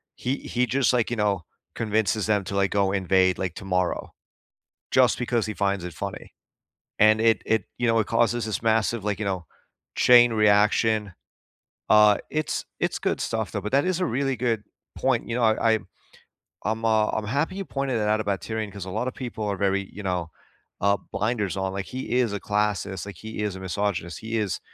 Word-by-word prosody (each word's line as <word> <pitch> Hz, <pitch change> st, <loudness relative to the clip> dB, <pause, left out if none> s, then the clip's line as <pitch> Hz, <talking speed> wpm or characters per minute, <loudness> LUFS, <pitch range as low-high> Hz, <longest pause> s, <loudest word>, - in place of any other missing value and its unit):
he 130 Hz, +2 st, -1 dB
he 125 Hz, +1 st, -1 dB
just, 130 Hz, 0 st, +2 dB
like, 120 Hz, -2 st, +1 dB
you 120 Hz, -, 0 dB
know, 100 Hz, -4 st, +1 dB, 0.3 s
convinces 110 Hz, -2 st, 0 dB
them 105 Hz, -2 st, +2 dB
to, 100 Hz, -, -5 dB
like, 100 Hz, 0 st, +2 dB
go 100 Hz, -1 st, +2 dB
invade, 95 Hz, -1 st, +2 dB
like, 90 Hz, -3 st, -3 dB
tomorrow, 90 Hz, -2 st, -2 dB, 0.8 s
just -, -, +4 dB
because 120 Hz, -3 st, 0 dB
he 110 Hz, -, -4 dB
finds 100 Hz, -2 st, -1 dB
it 90 Hz, -, -6 dB
funny. -, -, -7 dB, 0.7 s
And 110 Hz, +1 st, +5 dB
it 115 Hz, 0 st, +3 dB
it 110 Hz, -4 st, +1 dB
you 120 Hz, -, +1 dB
know, 115 Hz, 0 st, +3 dB
it 105 Hz, -, -1 dB
causes 120 Hz, +1 st, +1 dB
this 110 Hz, 0 st, -3 dB
massive, 115 Hz, 0 st, +1 dB
like, 105 Hz, -1 st, -1 dB
you 110 Hz, -, -2 dB
know, 95 Hz, -4 st, -2 dB, 0.5 s
chain 120 Hz, -1 st, +7 dB
reaction. 105 Hz, -1 st, +3 dB, 0.8 s
Uh, 105 Hz, -1 st, +7 dB
it's 155 Hz, 0 st, -2 dB, 0.2 s
it's -, -, 0 dB
good -, -, -1 dB
stuff, -, -, -2 dB
though, -, -, -2 dB
but 105 Hz, -, -5 dB
that 140 Hz, +1 st, +4 dB
is 185 Hz, -1 st, 0 dB
a 180 Hz, -, +1 dB
really 135 Hz, +1 st, 0 dB
good 115 Hz, -4 st, 0 dB, 0.3 s
point, -, -, 0 dB
you 115 Hz, -, -2 dB
know, 125 Hz, -, 0 dB
I 110 Hz, 0 st, +3 dB
I -, -, +1 dB, 0.9 s
I'm, 110 Hz, +1 st, -1 dB
uh 110 Hz, -1 st, +3 dB
I'm 110 Hz, -, -2 dB
happy 145 Hz, -, -1 dB
you 195 Hz, -, -4 dB
pointed 135 Hz, -2 st, -2 dB
it 105 Hz, -1 st, 0 dB
out 110 Hz, +1 st, +2 dB
about 100 Hz, -3 st, -2 dB
Tyrion, 110 Hz, -2 st, -4 dB
'cause 100 Hz, -1 st, -7 dB
a 95 Hz, -, -6 dB
lot 125 Hz, +7 st, -2 dB
of -, -, -14 dB
people 120 Hz, -4 st, -5 dB
are 100 Hz, -2 st, -2 dB
very, 100 Hz, -1 st, 0 dB
you 105 Hz, -, -8 dB
know, 90 Hz, -3 st, -2 dB, 0.5 s
uh, 100 Hz, +1 st, +3 dB
blinders 105 Hz, -3 st, -1 dB
on, 95 Hz, 0 st, -2 dB
like, 100 Hz, 0 st, -3 dB
he 130 Hz, +1 st, -6 dB
is 120 Hz, -4 st, +1 dB
a 100 Hz, -, -2 dB
classist, 100 Hz, -2 st, -1 dB
like, 100 Hz, -4 st, -9 dB
he 110 Hz, +2 st, -6 dB
is 105 Hz, -3 st, -2 dB
a -, -, -7 dB
misogynist, 95 Hz, -3 st, -2 dB
he 115 Hz, +1 st, -3 dB
is, 105 Hz, -4 st, -1 dB
105 Hz, 205 wpm, -25 LUFS, 100-115 Hz, 0.9 s, chain